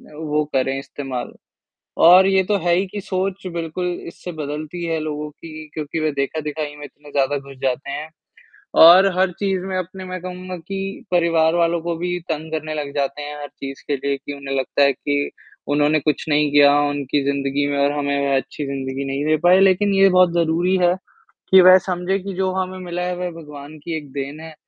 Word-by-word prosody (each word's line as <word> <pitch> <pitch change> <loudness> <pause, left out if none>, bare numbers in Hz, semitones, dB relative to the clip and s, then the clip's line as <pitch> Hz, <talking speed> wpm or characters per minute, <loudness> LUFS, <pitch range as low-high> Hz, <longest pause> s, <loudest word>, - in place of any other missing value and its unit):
वो 150 -1 -1
करें, 135 0 +1
इस्तेमाल। 135 -3 -6 0.7
और 185 +2 +8
ये 190 -1 +3
तो 205 +2 +1
है 175 - +4
ही 190 +2 +1
कि 205 +2 -6
सोच 190 0 -3
बिल्कुल 170 +1 -3 0.2
इससे 180 +1 -8
बदलती 155 +2 -5
है 165 -1 -1
लोगों 150 -1 -4
की, 155 +1 -10
क्योंकि 155 +1 -4
वह 155 0 +1
देखा-दिखाई 150 +1 -3
में 145 - -10
इतने 145 0 -17
ज़्यादा 140 0 +1
घुस 140 0 -12
जाते 130 +1 -1
हैं 150 +2 -5 0.7
और 175 +4 +9
हर 190 0 +3
चीज़ 195 -2 0
में 190 -1 -3
अपने 185 +1 -6
मैं 185 0 -6
कहूँगा 185 0 -6
कि 195 +5 -6
परिवार 165 -2 +3
वालों 170 0 +2
को 170 0 -2
भी 180 +1 -2
तंग 160 0 -3
करने 155 0 -3
लग 145 -2 -4
जाते 140 +1 -2
हैं 145 0 -6
हर 145 - -6
चीज़ 135 -1 -9
के 145 - +1
लिए, 140 +1 -2
कि 140 +1 -8
उन्हें 140 -1 -5
लगता 135 +2 0
है 140 0 +5
कि, 145 +2 -2 0.4
उन्होंने 145 +1 +3
कुछ 150 0 -1
नहीं 150 -1 +2
किया 145 -1 +7 0.2
उनकी 145 0 -1
ज़िंदगी 140 0 0
में - - -1
और 140 +1 +2
हमें 140 0 0
वह 140 -1 +2
अच्छी 135 +2 -3
ज़िंदगी 135 0 -4
नहीं 135 +1 -2
दे 155 0 +3
पाए, 180 +2 +6
लेकिन 195 +1 +3
ये 195 0 +6
बहुत 180 -1 +4
ज़रूरी 170 +2 +2
है, 175 -1 +3 0.6
कि 190 - +8
वह 185 +1 +9
समझे 180 +2 -1
कि 195 +1 -6
जो 190 +1 0
हमें 185 0 -3
मिला 175 0 -4
है 180 0 -2
वह 180 0 -3
भगवान 150 -2 -10
की 165 -1 -3
एक 145 -3 -8
देन 140 +2 -5
है। 160 0 -10
155 Hz, 205 wpm, -21 LUFS, 145-180 Hz, 0.7 s, और